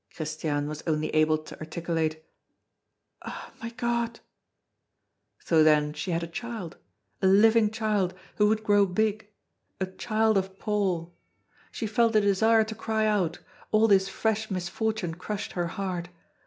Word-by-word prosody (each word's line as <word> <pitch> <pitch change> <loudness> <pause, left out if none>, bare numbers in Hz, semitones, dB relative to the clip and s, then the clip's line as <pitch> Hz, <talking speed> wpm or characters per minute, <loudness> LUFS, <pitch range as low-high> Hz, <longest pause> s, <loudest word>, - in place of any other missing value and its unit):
Christiane 155 -2 -2
was 150 +1 -5
only 155 -1 0
able 155 0 +4
to 155 - -12
articulate: 160 -1 -2 1.0
"Ah! - - -8
my 230 - -4
God!" 235 -1 -2 1.2
So 160 -2 +4
then 150 -1 +4
she 185 - -5
had 170 -1 0
a - - -4
child, 215 -1 -6 0.4
a 190 - +4
living 215 +3 +5
child, 210 -4 0 0.2
who 210 - +4
would 220 +1 +1
grow 205 -2 +4
big 215 +3 -1 0.5
a 190 - 0
child 215 +2 +1
of 190 0 -6
Paul! 190 -6 -1 0.6
She 225 - -4
felt 225 +1 +2
a 215 - +6
desire 220 +3 +4
to 220 0 -6
cry 220 0 -1
out, 190 -6 +1 0.3
all 220 +1 +4
this 195 -2 +4
fresh 220 +2 -1
misfortune 190 0 -2
crushed 200 +4 -5
her 175 -1 -2
heart. 180 -1 -4
195 Hz, 145 wpm, -27 LUFS, 170-220 Hz, 1.2 s, a